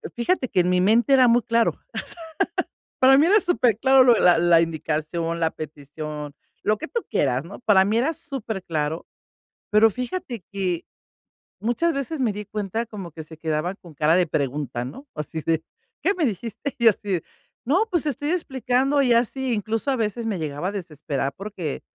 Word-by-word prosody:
fíjate 255 +3 0
que 180 - +3
en 180 - 0
mi 180 0 +3
mente 225 +7 +4
era 260 -2 +6
muy 240 +1 +5
claro, 230 0 +2 0.2
o - - -6
sea. 345 - -4 0.8
Para 265 +1 +7
mí 295 - +5
era 415 +4 +6
superclaro 265 - +4
lo 245 -1 +7
de 225 - +1
la 180 - +6
la 170 -1 +5
indicación, 165 +1 -2
la 160 -1 +1
petición, 150 0 -7 0.3
lo 215 - +2
que 320 - -6
tú 470 +4 -3
quieras, 130 -2 +1
¿no? 190 - -10
Para 200 -5 +4
mí 210 +3 +1
era 270 +8 +1
superclaro, 190 - -4 0.7
pero 215 +1 +6
fíjate 250 - -5
que, 185 -4 -2 0.8
muchas 245 +10 +1
veces, 275 +3 -3
me 245 -5 +2
di 210 +1 -6
cuenta 210 +3 -3
como 200 -6 -8
que 160 +1 -8
se 160 +1 -13
quedaban 160 +3 -2
con 170 -4 -13
cara 155 +3 +3
de 180 -1 +3
pregunta, 140 -4 -2
¿no? 270 - -9
Así 155 +1 -5
de: 160 -1 +1 0.4
"¿Qué 395 - +3
me 335 - +1
dijiste?" 230 +4 -4
Y 235 - -4
yo - - +10
así 205 0 -5
de: 170 - -1 0.4
"No, 360 - +2
pues 345 -6 0
te 305 - 0
estoy 290 +2 -3
explicando". 270 -4 +1
Ya 240 -3 +4
sí 265 +1 -3
incluso, 220 +4 -2
a 270 - +2
veces, 225 0 -2
me 215 -4 -1
llegaba 155 +1 -3
a - - -1
desesperar 150 -7 -3
porque, 190 -7 -5
210 Hz, 195 wpm, -24 LUFS, 165-255 Hz, 0.8 s, yo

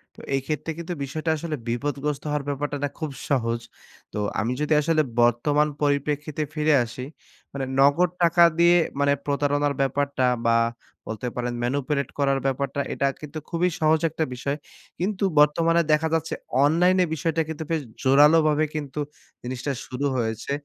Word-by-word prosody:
তো - - -12
এই 135 - 0
ক্ষেত্রে 155 +1 -2
কিন্তু 170 +1 -4
বিষয়টা 155 +4 -3
আসলে 155 0 -3
বিপদগ্রস্ত 140 +4 -2
হওয়ার 150 -1 -1
ব্যাপারটা 145 +1 -2
না 145 - 0
খুব 155 -3 -3 0.2
সহজ। 115 -4 +1 0.5
তো - - -4 0.2
আমি 110 +2 0
যদি 150 +1 +1
আসলে 155 +1 +2 0.2
বর্তমান 145 +6 +3
পরিপ্রেক্ষিতে 145 +1 0
ফিরে 155 0 +2
আসি। 120 +3 -7 0.5
মানে 135 -1 -3
নগদ 145 +6 +5
টাকা 170 0 +5 0.2
দিয়ে 170 +1 +6 0.2
মানে 140 0 +3
প্রতারণার 145 0 +1
ব্যাপারটা 135 0 0 0.2
বা 115 0 +4 0.5
বলতে 110 +3 -4
পারেন 120 0 -2
manipulate 140 +3 -1
করার 135 -1 +2
ব্যাপারটা 140 +1 -1
এটা 140 - +1
কিন্তু 150 +1 -6
খুবই 175 +1 +1
সহজ 155 0 +3
একটা 160 +1 -2
বিষয়। 140 +3 -3 0.4
কিন্তু 195 +2 -1 0.2
বর্তমানে 165 +3 +4
দেখা 155 +1 +2
যাচ্ছে 165 0 0 0.3
অনলাইনে 180 +4 +4
বিষয়টা 160 +1 0
কিন্তু 160 0 -4
বেশ 160 -2 +1 0.2
জোরালোভাবে 150 +3 +5
কিন্তু 150 -1 -4 0.4
জিনিসটা 125 +3 -3
শুরু 130 +3 -4
হয়েছে। 115 +2 -2
145 Hz, 150 wpm, -24 LUFS, 135-160 Hz, 0.5 s, দিয়ে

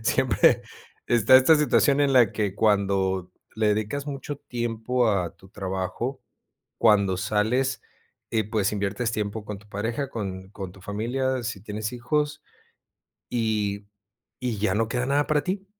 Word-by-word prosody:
Siempre - - +3 0.5
está 120 +1 +6
esta 130 +5 +6
situación 145 -1 +3
en 140 -1 +3
la 120 -6 +6
que 105 -3 -2
cuando 95 -3 +1 0.2
le 105 -1 +3
dedicas 110 +7 -3
mucho 145 0 -5
tiempo 120 -1 -1
a 90 -4 -1
tu 95 - -17
trabajo, 95 +6 -4 0.6
cuando 100 -4 +4
sales, 120 +7 0 0.5
eh, 110 -2 +1
pues, 105 -3 +1
inviertes 100 +3 -1
tiempo 105 -1 -3
con 105 -2 -6
tu 105 - -19
pareja, 115 +7 -3
con 95 -4 -5
con 95 -3 -7
tu 95 +1 -16
familia, 125 +6 -1
si 115 -4 -4
tienes 105 +2 -4
hijos, 145 +4 -1 0.9
y 105 -4 -1 0.5
y 120 -5 -2
ya 110 +2 +1
no 115 +1 +1
queda 125 +2 -1
nada 145 +1 +2
para 150 -1 +2
ti. 190 +1 -3
110 Hz, 150 wpm, -25 LUFS, 100-125 Hz, 0.9 s, está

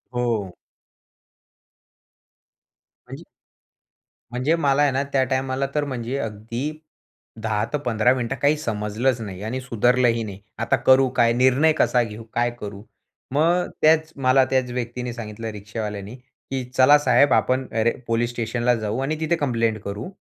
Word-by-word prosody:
हो. 115 -6 -1 2.6
म्हणजे - - -9 1.1
म्हणजे 130 +7 +1
मला 145 -3 +2
आहे 145 - +4
ना 135 +1 0
त्या 135 -1 +3
टायमाला 130 +1 -1
तर 150 - +2
म्हणजे 130 -1 -4
अगदी 115 +6 -4 0.7
10-15 115 +2 +1
मिनिटं 125 0 -2
काही 145 +2 +3
समजलंच 115 -1 -1
नाही 95 -3 -7
आणि 120 +4 -3
सुधरलंही 120 -1 +2
नाही. 100 -3 -8 0.2
आता - - +1
करू 130 0 +4
काय? 115 0 +4
निर्णय 130 +6 +4
कसा 125 -1 +3
घेऊ? 110 0 -8
काय 120 0 +1
करू? 100 -1 -7 0.5
मग 170 +5 +2
त्याच 160 0 +4
मला 135 0 +4
त्याच 130 -2 0
व्यक्तीने 120 0 -4
सांगितलं 115 -1 -6
रिक्षावाल्याने, 105 0 -6
की 130 0 -8
"चला 140 +3 +7
साहेब 145 -1 +4
आपण 130 +1 +2
अरे 115 +1 +3 0.2
पोलीस 115 +1 +1
स्टेशनला 120 +1 0
जाऊ 110 +2 -3
आणि 150 +3 -2
तिथे 160 +2 +1
कंप्लेंट 115 -7 0
करू. 100 - -5
125 Hz, 135 wpm, -23 LUFS, 115-135 Hz, 2.6 s, चला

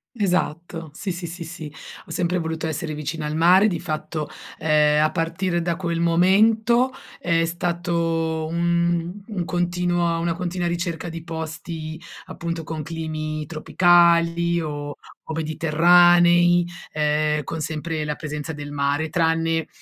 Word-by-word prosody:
Esatto, 175 -5 -1
sì, 190 +5 -4
sì, 175 0 -5
sì, 170 +1 -7
sì, 160 -2 -8 0.4
ho - - -17
sempre 180 0 0
voluto 160 -1 -3
essere 155 0 -3
vicina 150 +1 -4
al 150 - -3
mare. 180 +5 +6
Di 175 -6 -1
fatto, 155 -1 -4 0.3
ehm, 150 -1 +3
a 155 - +2
partire 170 +1 -1
da 170 0 -1
quel 170 -2 -2
momento 220 +9 +4 0.3
è 165 -1 +1
stato 165 -2 -1
un 170 +1 0
un 195 -6 -3
continuo 175 -1 0
una 170 0 0
continua 175 +1 -3
ricerca 170 -1 -3
di 165 0 -7
posti 160 -1 -6 0.3
appunto 165 -1 -5
con 160 -1 -5
climi 155 -1 -4
tropicali 170 +1 +3
o 145 -2 -5 0.3
o - - -2
mediterranei, 175 +2 +5 0.3
ehm, 150 0 +1
con 160 +4 -5
sempre 155 +1 -3
la 150 0 -2
presenza 150 0 -5
del 145 -1 -7
mare, 145 +2 0
tranne, 165 -1 +1
165 Hz, 135 wpm, -23 LUFS, 155-175 Hz, 0.4 s, mare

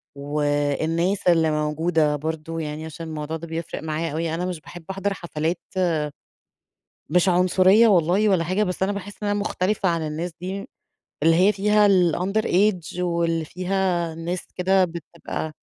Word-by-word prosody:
والناس 145 +6 0
اللي 165 -2 +4
موجودة 150 0 +1
برضو، 160 +2 -4
يعني 155 0 -5
عشان 160 +1 -7
الموضوع 155 0 -4
ده 170 +1 -9
بيفرق 165 -1 -5
معايا 160 +1 -2
أوي. 160 +1 -2
أنا 180 - -2
مش 180 -3 -4
باحب 175 +2 -11
احضر 195 +1 -2
حفلات 170 -1 -3 1.5
مش 180 +4 +3
عنصرية 185 +5 +5
والله 190 +2 +3
ولا 185 -4 +3
حاجة، 185 +5 +1
بس 180 -1 -2
أنا 195 - +1
باحس 205 +1 -7
إن 205 - 0
أنا 205 0 0
مختلفة 195 0 0
عن 165 -2 -1
الناس 165 +3 -4
دي، 190 +2 -4 0.6
اللي 165 +1 +5
هي 190 +4 +5
فيها 210 +1 +3
الunder 185 +2 +2
age 180 -3 +1
واللي 170 -2 0
فيها 180 -1 -1
ناس 170 +2 -4
كده 185 +1 +3
بتبقى 170 -1 -6
170 Hz, 155 wpm, -23 LUFS, 160-190 Hz, 1.5 s, عنصرية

